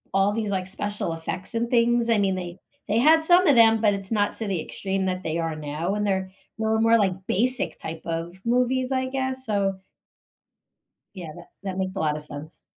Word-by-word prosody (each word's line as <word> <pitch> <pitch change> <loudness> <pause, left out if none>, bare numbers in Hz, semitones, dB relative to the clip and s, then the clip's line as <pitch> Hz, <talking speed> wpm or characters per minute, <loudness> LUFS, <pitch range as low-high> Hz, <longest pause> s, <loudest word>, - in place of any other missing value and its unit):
all 195 +1 +3
these, 215 -2 -2
like, 185 -2 -1
special 205 -1 -3
effects 165 +5 -5
and 235 +1 0
things. 235 0 +3
I 230 - +4
mean, 195 -2 +1
they 180 0 -6 0.3
they 215 +3 +2
had 315 +5 +5
some 355 +1 +6
of 280 - +5
'em, 225 -1 +6
but 210 -2 +4
it's 195 +1 -4
not 205 -2 +1
to 225 - -3
the 185 -5 -1
extreme 190 +2 -3
that 185 0 -2
they 165 +1 -2
are 165 -1 -2
now, 155 +6 -3
and 210 0 -1
they're 190 -1 -1 0.3
they 220 - -1
were 220 0 +2
more 225 0 +5
like 190 -2 -1
basic 250 +6 +1
type 160 0 -6
of 170 +2 -4
movies, 250 +2 +1
I 260 0 0
guess, 260 -1 -2
so 195 -3 0 1.4
yeah, 175 -4 -7
that 175 - -12 0.2
that 190 -1 -4
makes 190 0 -2
a - - -3
lotta 150 -1 0
sense. 150 +1 -10
200 Hz, 210 wpm, -24 LUFS, 185-230 Hz, 1.4 s, some